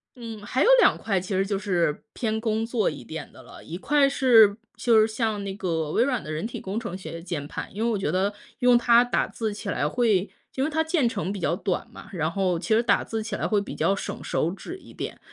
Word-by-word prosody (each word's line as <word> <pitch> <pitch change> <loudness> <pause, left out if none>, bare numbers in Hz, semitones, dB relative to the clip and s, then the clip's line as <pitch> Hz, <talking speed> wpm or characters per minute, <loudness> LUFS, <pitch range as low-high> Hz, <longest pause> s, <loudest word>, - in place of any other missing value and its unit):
嗯， 225 -4 -8
还 260 +6 0
有 - - +5
2 - - +5
块 195 -4 -1
其 190 +2 -4
实 190 - +2
就 200 0 -1
是 175 -6 0
偏 220 -2 -1
工 220 -1 0
作 225 -2 +1
一 - - -9
点 160 -1 -7
的 - - -13
了。 - - -13
1 165 - -7
块 280 +9 +3
是 230 -7 +6 0.2
就 230 -3 +4
是 215 - +4
像 220 -2 -2
那 195 - -4
个 165 -6 -2
微 230 - +3
软 255 -3 -1
的 155 - -6
人 155 +6 -3
体 235 - -5
工 195 +3 -3
程 225 -7 -5
学 185 - -8
的 165 - -6
键 165 -4 -5
盘， - - -5
因 215 - -3
为 235 - +2
我 220 - 0
觉 195 - -1
得 190 +3 +1 0.3
用 245 -1 +5
它 235 0 +5
打 245 - 0
字 220 -2 -3
起 205 +1 -8
来 145 - 0
会 210 -3 +2 0.2
因 265 - -1
为 295 - +1
它 320 +1 +1
键 315 -6 +1
程 200 -3 -3
比 200 - -5
较 170 -1 0
短 185 -1 -2
嘛， - - -12
然 160 -2 -1
后 185 -2 0
其 220 +5 +1
实 230 - +3
打 - - +3
字 225 -1 -4
起 215 -1 -4
来 - - -1
会 210 - +2
比 200 - -6
较 195 - +2
省 - - -6
手 165 - 0
指 275 - -8
一 - - -15
点。 - - -6
210 Hz, 275 characters per minute, -25 LUFS, 185-235 Hz, 0.3 s, 是